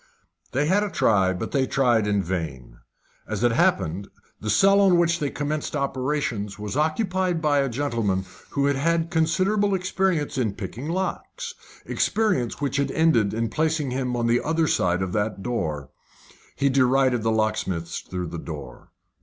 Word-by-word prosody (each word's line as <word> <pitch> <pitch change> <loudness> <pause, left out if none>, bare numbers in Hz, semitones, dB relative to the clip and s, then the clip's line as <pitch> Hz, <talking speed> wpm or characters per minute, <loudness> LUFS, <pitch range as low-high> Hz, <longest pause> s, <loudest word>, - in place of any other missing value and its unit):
They 145 - +1
had 190 +6 +3
a 210 - -1
try, 95 - +3
but 95 - -4
they 135 -2 +1
tried 120 -6 +2
in 100 -1 +1
vain. 75 -10 -5 0.5
As - - -3
it 120 - +4
happened, 95 -4 +1 0.3
the 105 - -4
cell 195 - +5
on 190 -3 +5
which 170 0 +2
they 145 - -1
commenced 150 +2 -3
operations 130 -7 -2
was 105 +2 -5
occupied 180 +3 0
by 150 -3 +2
a 135 -1 +1
gentleman 115 -8 -1 0.2
who 140 -1 0
had 140 -1 +2
had 165 +4 +2
a - - -3
considerable 185 +5 +2
experience 185 -6 0
in 110 -5 0
picking 115 - -6
locks 190 - -3 0.3
experience 205 - 0
which 140 -1 -1
had 140 - +1
ended 150 -11 +3
in 115 +1 -1
placing 155 0 0
him 125 -1 -1
on 120 -1 0
the 120 +1 +3
other 160 +1 +1
side 90 - +1
that 105 -2 -1
door. 80 - -3 0.7
He 140 - +1
derided 130 -2 +3
the 115 - 0
locksmiths 110 -6 -1
through 90 -2 -5
the 85 - -6
door. 70 -7 -9
130 Hz, 165 wpm, -24 LUFS, 105-160 Hz, 0.7 s, cell